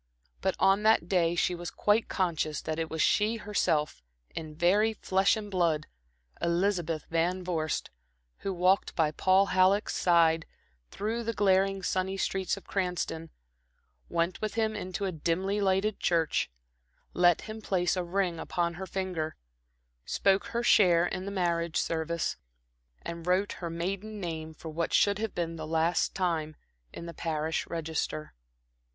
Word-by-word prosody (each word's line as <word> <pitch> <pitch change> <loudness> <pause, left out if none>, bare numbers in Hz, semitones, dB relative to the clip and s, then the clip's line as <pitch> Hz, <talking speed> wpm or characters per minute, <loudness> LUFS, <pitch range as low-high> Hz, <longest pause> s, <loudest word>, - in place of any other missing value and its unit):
But - - 0
on 195 +1 +4
that 215 -6 +4
day 175 -3 +2
she 180 - +1
was 175 0 -5
quite 210 +2 +1
conscious 160 -5 -1
that 155 0 -3
it 160 -1 -2
was 160 -1 0
she 215 +2 +3
herself, 200 - 0 0.3
in 155 -2 -6
very 205 +7 +3
flesh 195 0 +2
and 210 -1 -6
blood, 165 -5 +1 0.6
Elizabeth 170 -2 0
Van 175 +3 +1
Vorst, 160 -4 -2 0.5
who 195 - -3
walked 185 +2 +2
by 155 -3 +2
Paul 190 +5 +3
Halleck's 190 +3 +3
side 165 -2 +3 0.4
through 220 +3 -3
the 230 0 -3
glaring, 195 -1 +2
sunny 190 +2 -1
streets 190 0 -1
of 200 - -10
Cranston, 180 -4 -2 0.8
went 170 +1 -1
with 215 0 -3
him 220 -1 0
into 185 -1 -3
a 190 - -1
dimly 185 +5 -1
lighted 195 +2 +1
church, 165 -3 +1 0.6
let 175 -1 +4
him 220 0 -7
place 180 -4 +1
a 180 - -1
ring 175 -1 -1
upon 170 0 -1
her 190 - -4
finger, 180 -4 -3 0.7
spoke 195 0 +2
her 235 0 -2
share 175 -7 +5
in 185 +1 -3
the 200 - -4
marriage 170 -3 0
service, 165 0 -1 0.7
and 170 0 -6
wrote 185 +3 +2
her 170 - -5
maiden 195 +6 -4
name 160 -3 -5
for 160 - -8
what 165 +1 -1
should 205 0 +3
have 220 -2 -3
been 165 -1 -2
the 155 -1 -6
last 165 +2 +1
time, 160 -4 -1 0.4
in 170 - -8
the 170 - -7
parish 160 -1 -2
register. 160 -2 -3
180 Hz, 155 wpm, -29 LUFS, 165-195 Hz, 0.8 s, share